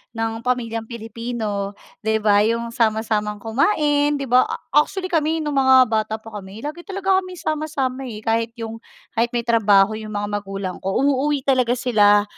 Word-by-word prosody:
ng 225 0 -2
pamilyang 230 -2 -2
Pilipino 225 -3 -4 0.2
'di 220 0 -1
'ba 205 -1 +5
'yong 230 +2 0
sama-samang 215 -2 0
kumain 290 - +2
'di 280 - -3
'ba. 255 +1 +5 0.2
Actually 370 +6 +1
kami 320 0 +1
nung 295 -2 0
mga 260 -1 +7
bata 220 0 0
pa 220 +1 -11
kami 195 +3 -11
lagi 310 +6 -6
talaga 385 -1 +1
kami 370 -1 -8
sama-sama 290 -5 -2 0.2
kahit 230 +1 0
yung, 225 -1 -6 0.3
kahit 230 0 +1
may 235 - 0
trabaho 210 -4 +4
yung 215 -1 -6
mga 205 0 -2
magulang 195 -2 -5
ko 195 0 -3
uuwi 285 0 +1
talaga 255 -3 +2
sila 205 -5 +4
230 Hz, 160 wpm, -21 LUFS, 215-280 Hz, 0.3 s, mga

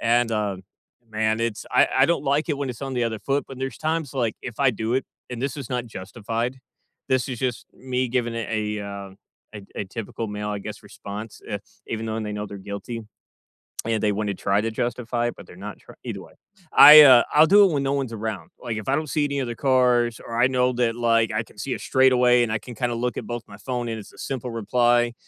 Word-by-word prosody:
and, 120 0 +2
uh, 105 -3 -1 0.5
man, 110 +1 0
it's 115 -2 -2
I - - +5
I 135 - +7
don't 170 - +1
like 145 +4 +1
it 145 - 0
when 140 -2 -2
it's 115 - -9
on 135 -1 -4
the 125 - 0
other 110 -2 -2
foot. 140 +4 -1
But 135 - -9
there's 135 0 -4
times 155 -3 -2
like 115 -4 -1
if 120 0 -7
I 135 -2 +5
do 110 +1 -2
it 130 - 0 0.3
and 125 0 -5
this 140 +1 -2
is 135 -4 -6
not 125 -1 -1
justified, 115 +5 -4 0.5
this 130 -1 +1
is 125 - -4
just 125 -3 -2
me 130 0 -2
giving 120 -1 -1
it 115 -2 -3
a 105 -1 -2
uh, 100 -1 -7 0.4
a 105 - -7
a - - -3
typical 110 +2 -6
male, 105 0 -4
I 105 -1 -3
guess, 105 +1 -8
response, 105 +2 -8
uh, 105 - -2 0.3
even 115 0 -3
though 110 0 -2
they 105 -1 -4
know 105 0 -4
they're 100 - -8
guilty. 115 +4 -5 0.8
And 110 -2 -1
they 105 - +3
wanna 105 -1 -1
try 100 +2 +1
to 115 +1 -2
justify 120 +1 -1
it, - - -5
but 90 - -12
they're - - -13
not - - -9
tr - - -15
either - - -5
way, - - -14 0.4
I 150 +1 +11
uh, 130 -4 +8
I'll 155 +2 +7
do 205 +3 +7
it 190 - +4
when 140 -2 0
no 135 - 0
one's 135 -4 -1
around, 110 -2 -5
like, 115 - -4
if 110 - -6
I 140 - +3
don't 155 -1 -2
see 150 - 0
any 140 -1 -1
other 120 -2 -3
cars, 125 -3 +2
or 115 0 -4
I 125 - +6
know 125 -1 +2
that 120 -1 0
like, 115 -1 +2
I 110 +1 -1
can - - -21
see 135 - -2
it - - -7
straight 130 -1 +4
away 125 -1 +5
and 120 - 0
I 110 - +1
can 120 +3 -10
kind 120 +2 -1
of 115 - -3
look 125 +1 -2
at - - -4
both 120 -1 -5
my 100 - -12
phone 120 +1 -4
and 115 -1 -3
it's 100 - -13
a - - -19
simple 125 -2 -4
reply, 120 +2 +2
120 Hz, 250 wpm, -24 LUFS, 110-130 Hz, 0.8 s, I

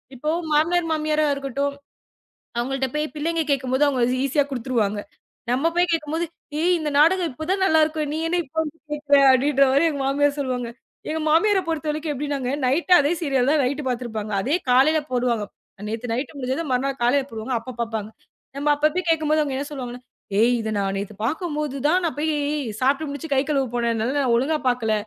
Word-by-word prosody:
இப்போ 300 +5 -3 0.2
மாமனார், 330 +3 +2
மாமியாரா 310 0 +1
இருக்கட்டும், 280 +1 -2 0.8
அவங்க 245 +3 -1
கிட்ட 265 0 -1
போய் 300 0 0
பிள்ளைங்க 325 +2 0
கேக்கும்போது 265 +1 +2
அவங்க 265 -3 +1 0.2
ஈஸியா 285 +1 +2
குடுத்துருவாங்க. 230 -5 -1 0.5
நம்ம 280 +7 +2
போய் 355 0 +3
கேக்கும்போது, 320 +1 -1 0.4
ஏய் 360 +1 +3
இந்த 300 - -2
நாடகம் 335 +1 +4
இப்போ 315 +5 -7
தான் 385 0 +1
நல்லா 320 -3 +4
இருக்கு. 310 0 -2
நீ 315 - -2
என்ன 355 +1 +1
இப்ப 280 +4 -25
வந்து 315 +1 -7
கேக்குற. 295 -1 +2 0.2
அப்படின்ற 275 +1 +3
மாதிரி 305 +5 +4
எங்க 285 -2 -4
மாமியார் 285 +1 +1
சொல்லுவாங்க. 250 -3 -2 0.4
எங்க 315 0 -2
மாமியாரை 380 +4 +4
பொறுத்தவரைக்கும் 305 -1 -2
எப்படி 290 +2 -4
நாங்க 255 -1 -2
நைட் 330 +8 +1
அதே 290 +3 +1
சீரியல் 270 -3 +2
தான் 305 -3 +3
நைட் 280 +4 -1
பாத்துருப்பாங்க. 220 -4 -4
அதே 295 - +1
காலையில 295 +5 +5
போடுவாங்க. 240 -4 0 0.4
நேத்து 230 +1 -4
நைட் 265 +4 -4
முடிஞ்சது 265 +5 -2
மறுநாள் 270 +1 -1
காலையில 270 +2 +2
போடுவாங்க. 225 +3 -4
அப்பப் 240 0 -9
பாப்பாங்க. 220 -2 -4 0.5
நம்ம 295 +1 -1
அப்பப்போ 305 +5 +1
கேக்கும்போது 310 -1 +2
அவங்க 275 0 -3
சொல்லுவாங்கன்னா. 250 -2 -6 0.4
ஏய் 235 +3 +4
இத 220 0 -3
நான் 195 -1 -1
நேத்து 200 +2 -5
பாக்கும்போது 300 0 -2
தான் 360 +4 +3
நான் 325 - -1
போய்ச் 305 +2 -1 0.5
சாப்பிட்டு 280 +4 +1
முடிச்சு 285 +3 -6
கை 265 - +4
கழுவ 280 -3 +1
போனதுல 240 +3 0
ஒழுங்கா 275 +6 +2
பாக்கல. 235 -3 0
280 Hz, 175 wpm, -23 LUFS, 250-310 Hz, 0.8 s, காலையில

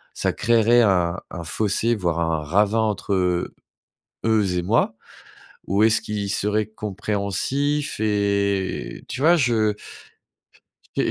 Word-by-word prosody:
ça - - -1
créerait 120 0 +3
un 90 -4 +2
un 85 -2 -7
fossé, 110 +6 0
voire 85 -6 -1
un 80 -2 0
ravin 105 +7 +2
entre, 105 -2 -1
heu, 90 -2 0 0.7
eux 105 -5 +2
et 90 - +1
moi? 110 +4 +1 0.7
Ou 100 +3 +1
est-ce 115 0 +3
qu'ils 105 -2 -3
seraient 105 +1 0
compréhensifs? 110 +8 -2
Et 100 -2 -1
tu 130 - -4
vois? 170 +3 +6
Je 110 -6 +1 1.2
j'ai - - +1
105 Hz, 125 wpm, -22 LUFS, 95-110 Hz, 1.2 s, vois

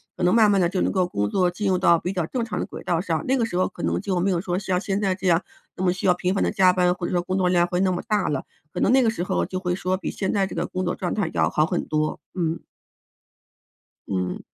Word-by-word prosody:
可 180 - -4
能 180 - +4
慢 220 -2 +5
慢 195 -2 +3
地 170 - +2
就 185 0 -2
能 - - +1
够 185 -2 +2
工 105 -11 -2
作 180 -2 +2
进 205 +3 -3
入 185 - +2
到 170 -2 +4
比 180 +2 -3
较 175 -3 -1
正 240 -3 -2
常 225 - -4
的 - - -1
轨 - - -9
道 170 -1 0
上， 160 -4 -2
那 265 - +3
个 235 -3 +1
时 180 -5 -3
候 185 - +2
可 - - -10
能 - - 0
就 190 -2 -1
没 195 - +1
有 175 - +1
说 175 0 -2
像 185 -2 -1
现 195 +1 -2
在 190 -2 +1
这 190 0 -4
样 170 +1 +4 0.3
那 185 - -4
么 180 - +3
需 185 - -4
要 180 - +6
频 180 +1 -1
繁 195 - 0
地 - - +2
加 185 -1 +4
班， 180 -1 +2
或 175 - -5
者 - - -5
说 175 -1 +1
工 185 +1 -2
作 180 -1 +2
量 175 -1 +3
会 180 +1 -1
那 190 -1 +2
么 175 - -2
大 210 -2 +1
了， 140 -3 -2 0.3
可 - - -3
能 - - +2
那 265 -1 +5
个 225 - +3
时 220 - -3
候 - - 0
就 185 - -4
会 180 -1 -1
说 185 0 -1
比 - - -4
现 190 - -2
在 195 -2 +1
这 - - -8
个 - - -1
工 185 0 -3
作 - - -1
状 180 -3 -3
态 195 -6 -1
要 - - +2
好 155 - +2
很 175 +1 -1
多， 155 0 -1
嗯。 165 -2 -1 1.5
嗯。 90 -2 -2
185 Hz, 330 characters per minute, -24 LUFS, 175-195 Hz, 1.5 s, 要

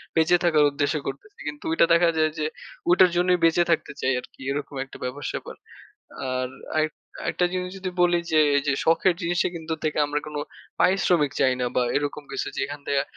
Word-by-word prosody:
বেঁচে 165 +2 +4
থাকার 160 -4 +4
উদ্দেশ্যে 145 +2 0
করতেছি। 135 +11 -8
কিন্তু 150 0 -6
ঐটা 165 - +5
দেখা 170 0 +5
যায় 155 0 +3
যে 150 - 0 0.5
ঐটার 180 +1 +6
জন্যই 180 0 +3
বেঁচে 165 +1 +4
থাকতে 165 - 0
চাই 135 - +2
আরকি 125 - -15
এরকম 145 0 -4
একটা 135 - -12
ব্যাপার 125 +3 -5
স্যাপার। - - -6 0.8
আর 130 0 -1 0.3
আরেক 155 0 +2 0.3
আরেকটা 180 - +1
জিনিস 180 0 -2
যদি 190 -1 -4
বলি 175 -1 +4
যে 155 - +5 0.2
এইযে 140 0 +1
শখের 170 +3 +4
জিনিসটা 175 +1 +1
কিন্তু 160 -1 -4
থেকে 155 -1 -1
আমরা 145 +1 -1
কোনো 150 -1 -4 0.4
পারিশ্রমিক 180 -6 +3
চাই 130 -2 +4
না - - +1
বা 125 - +3
এরকম 145 +1 -2
কিছু 135 - -3
যেখান 145 +2 -3
থেকে 140 -1 +2
155 Hz, 185 wpm, -25 LUFS, 145-175 Hz, 0.8 s, ঐটার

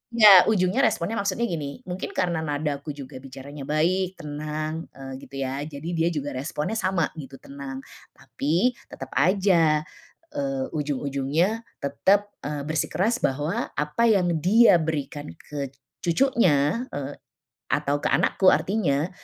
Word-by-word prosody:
Nggak, 205 -5 +9
ujungnya 190 +1 +2
responnya 200 +6 -1
maksudnya 200 +3 -1
gini, 155 - -5
mungkin 185 -4 -6
karena 175 -3 0
nadaku 145 -1 -3
juga 130 -2 -9
bicaranya 135 +1 -9
baik, 180 +5 +1
tenang, 155 0 -5
eee, 135 -1 -8
gitu 140 - -13
ya, 135 +1 -3
jadi 145 +1 -8
dia 165 -1 +1
juga 145 -4 -2
responnya 150 +10 -3
sama 185 -5 0
gitu, 135 -2 -9
tenang. 135 -1 -8 0.3
Tapi 170 - 0 0.2
tetap 135 -1 -9
aja, 165 -1 +3 0.5
eee, 275 -2 -2
ujung-ujungnya, 145 - 0 0.2
tetap, 200 +9 +2
eee, 145 -1 -4
bersikeras 175 - 0
bahwa, 150 - -1
apa 150 +10 0
yang 190 -6 +3
dia 195 +2 +6
berikan 150 -2 -3
ke 140 -3 -7 0.2
cucunya, 180 - +2
eee, 140 0 -5 0.5
atau 145 0 0
ke - - -3
anakku 190 - +2
artinya, 175 -6 +2
155 Hz, 130 wpm, -25 LUFS, 140-185 Hz, 0.5 s, Nggak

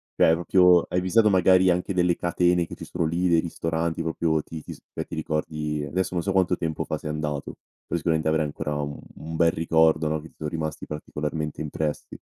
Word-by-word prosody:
cioè 80 - +5
proprio 90 +1 +5
hai 90 - +1
visitato 105 +4 +4
magari 95 -1 +5
anche 90 +2 0
delle 90 -1 +2
catene 90 0 +1
che - - -9
ci - - -10
sono 85 -2 -2
lì, 85 +3 0
dei 85 -1 +4
ristoranti 80 0 -2
proprio 80 -1 0
ti 80 +1 -8
ti - - -7
s - - -15 0.2
ehm, - - -3
ti - - -7
ricordi 75 -1 -2
adesso 90 +6 -2
non 85 -2 -1
so 100 - -1
quanto 90 -2 +2
tempo 80 -2 -2
fa - - -3
sei - - -6
andato. 75 -2 -4 0.3
Poi - - -2
sicuramente 80 -1 0
avrei 80 0 +2
ancora 75 0 -4
u 70 0 -5 0.2
un 80 +1 -7
bel 85 0 +4
ricordo, 80 -1 +3
no, 80 0 -1
che 80 - -11
ti - - -30
son 75 - -4
rimasti 80 -1 -4
particolarmente 75 0 -4
impressi. 75 0 -4
80 Hz, 215 wpm, -25 LUFS, 75-90 Hz, 0.3 s, cioè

